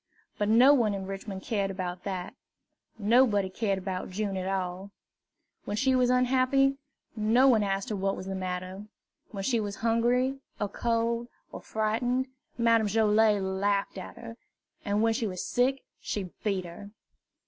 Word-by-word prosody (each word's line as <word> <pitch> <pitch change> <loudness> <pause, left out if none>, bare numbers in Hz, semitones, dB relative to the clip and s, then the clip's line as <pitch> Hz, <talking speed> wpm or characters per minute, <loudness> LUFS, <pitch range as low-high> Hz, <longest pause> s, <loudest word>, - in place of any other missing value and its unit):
But 205 0 +1
no 250 +6 +7
one 225 -7 +2
in 190 -1 -5
Richmond 195 0 -6
cared 200 -3 -1
about 180 -2 -5
that. 185 -2 -4 0.6
Nobody 210 -3 +3
cared 200 0 -1
about 185 -1 -4
June 200 +1 -2
at 185 0 -3
all. 190 0 -3 0.8
When 205 - -3
she 260 +2 +3
was 250 -1 +3
unhappy, 260 +2 +3 0.4
no 225 +5 +4
one 235 -5 +5
asked 195 +3 -1
what 195 -1 -1
was 185 - -7
the 195 - -4
matter; 185 +2 -5 0.4
when 195 -2 -6
she 235 +2 +1
was 205 -2 -3
hungry, 240 +4 +1 0.2
or 205 - -1
cold, 230 +2 -1 0.2
or - - -8
frightened, 240 +4 0 0.3
Madame 230 -2 +3
Joilet 210 -1 +3
laughed 195 +1 -1
at 185 - -9
her, 230 -1 -9 0.5
and 205 +2 +1
when 225 0 +3
she 225 -1 -1
was 185 -2 -4
sick 260 +2 +1 0.2
she 190 -4 -4
beat 195 -4 -1
her. 175 +4 -10
210 Hz, 160 wpm, -28 LUFS, 195-235 Hz, 0.8 s, no